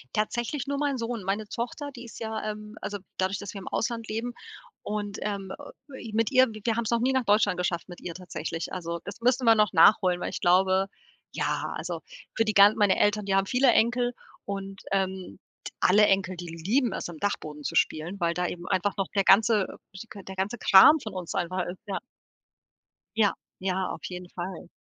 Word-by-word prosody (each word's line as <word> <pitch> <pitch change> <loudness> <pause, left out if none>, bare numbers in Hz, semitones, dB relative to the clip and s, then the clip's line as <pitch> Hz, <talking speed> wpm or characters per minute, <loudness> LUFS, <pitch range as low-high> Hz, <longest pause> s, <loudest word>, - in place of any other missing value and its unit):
Tatsächlich 240 +5 -1
nur 280 0 -1
mein 285 -2 0
Sohn. 230 -3 -3
Meine 205 +3 -2
Tochter, 265 +6 -5
die 240 -2 -10
ist 230 - -11
ja 220 -1 -3
ähm, 210 +1 -10
also 205 -1 -4 0.2
dadurch, 190 +1 0
dass 205 0 -7
wir 200 - -6
im 185 - -10
Ausland 230 -1 -2
leben 230 +3 -3 0.5
und, 205 -1 -3
ähm, 195 -2 -3 0.4
äh, 265 - -9
i - - -10
mit 225 +4 +1
ihr 260 0 +6
wir 215 +1 -2
haben's 235 -1 -1
noch 235 - +2
nie 260 +3 +1
nach 260 -3 +1
Deutschland 205 -3 +3
geschafft 180 0 -2
mit 175 - -10
ihr 170 - -6
tatsächlich. 165 -2 -5
Also, 170 -2 -4
das - - -8
müssen 250 +1 +2
wir 225 -1 +7
noch 210 -3 +2
nachholen, 180 +1 +5
weil - - -2
ich - - -5
glaube 190 +2 +3 0.5
ja, - - -1
also, - - -4 0.3
für 225 - +2
die 215 - 0
gan 200 +1 +7
meine 205 -3 +3
Eltern, 210 0 +2
die 195 - 0
haben 195 0 +2
viele 255 0 +4
Enkel 245 +2 +2 0.3
und, 195 -1 -6
ähm, 190 -1 -2 0.2
t - - -7
alle 210 +3 +5
Enkel, 190 -2 +1
die 175 0 -7
lieben 195 - 0
es, - - -4
im 170 -2 -9
Dachboden 150 -7 -3
zu - - -3
spielen, 175 +6 0
weil 170 -1 0
da 180 0 0
eben 175 0 -6
einfach 190 +2 0
noch 195 - -1
der 195 - +3
ganze, 210 +1 +5
äh, 190 - -14
sch 230 - -8
g 200 - -8
der 190 - -9
ganze 195 +5 -2
Kram 245 +11 +8
von 215 -5 -7
uns 180 -2 -5
einfach 180 +1 -1
ist, 180 +1 -7
ja. 195 - -2 1.2
Ja, 210 -3 +4 0.3
ja, 190 0 -1
auf - - -6
jeden 180 -1 -7
Fall. 175 -1 -6
200 Hz, 215 wpm, -27 LUFS, 185-225 Hz, 1.2 s, Kram